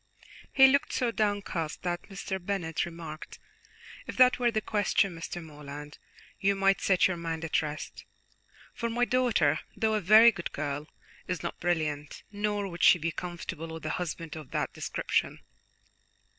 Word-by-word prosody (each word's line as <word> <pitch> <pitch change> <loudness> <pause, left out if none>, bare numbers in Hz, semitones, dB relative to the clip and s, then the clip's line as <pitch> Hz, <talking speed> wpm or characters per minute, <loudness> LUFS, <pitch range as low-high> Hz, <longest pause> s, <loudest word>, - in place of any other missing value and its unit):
He 270 - +7
looked 280 +1 +3
so 245 -2 +1
downcast 205 -7 -2
that 175 +2 -3
Mr. 190 -1 -5
Bennet 175 -4 -2
remarked: 165 -2 -8 0.7
"If - - -6
that 255 -1 +6
were 240 -1 +3
the 220 -2 0
question, 205 -3 +1
Mr. 165 +1 -6
Morland, 150 -1 -10 0.4
you 200 0 +2
might 195 0 +2
set 185 -2 +4
your 185 -2 -3
mind 165 -1 -4
at 160 - +1
rest, 150 -1 -6 0.7
for 235 - -3
my 240 +2 +1
daughter, 245 - +2 0.2
though 220 -1 +1
a 215 - +1
very 215 +5 +8
good 175 -5 -6
girl, 145 0 -3 0.4
is 180 -4 -3
not - - -4
brilliant, 155 -4 -2
nor 205 -1 -1
would 170 -3 -7
she 175 - +7
be 165 0 -2
comfortable 175 -1 -6
with 160 -1 -8
a - - -1
husband 165 -2 -5
of 155 -4 -9
that - - -2
description." - - -1
175 Hz, 160 wpm, -29 LUFS, 160-210 Hz, 0.7 s, very